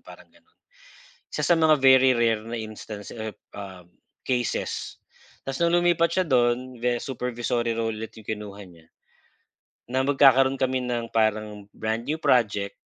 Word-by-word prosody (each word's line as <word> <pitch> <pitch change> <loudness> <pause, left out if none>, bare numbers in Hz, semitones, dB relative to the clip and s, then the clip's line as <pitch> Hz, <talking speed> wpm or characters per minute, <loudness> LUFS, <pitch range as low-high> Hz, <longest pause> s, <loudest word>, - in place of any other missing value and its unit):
parang - - -15
gano'n. - - -28 0.8
Isa - - -3
sa 175 - +5
mga 155 -2 +4
very 130 -1 +6
rare 115 -2 +1
na 115 - -9
instance 110 -1 -8
ep 110 -2 -7 0.2
um, 95 -3 -9 0.4
cases. 125 -2 -2 0.5
Tas 135 - -2
nung 170 - +2
lumipat 175 -1 +3
siya 185 +1 +1
do'n, 125 0 +1
ve 120 0 -1
supervisory 120 -2 -2
role 115 -1 -2
ulit 110 +1 -7
yung 105 - -20
kinuha 100 -2 -10
niya, 85 -2 -18 1.1
na 130 - +2
magkakaroon 135 -1 +4
kami 130 0 0
ng 120 -1 -3
parang 110 -2 -1
brand 110 +2 -3
new 155 - 0
project 105 -9 +1
120 Hz, 150 wpm, -25 LUFS, 110-130 Hz, 1.1 s, very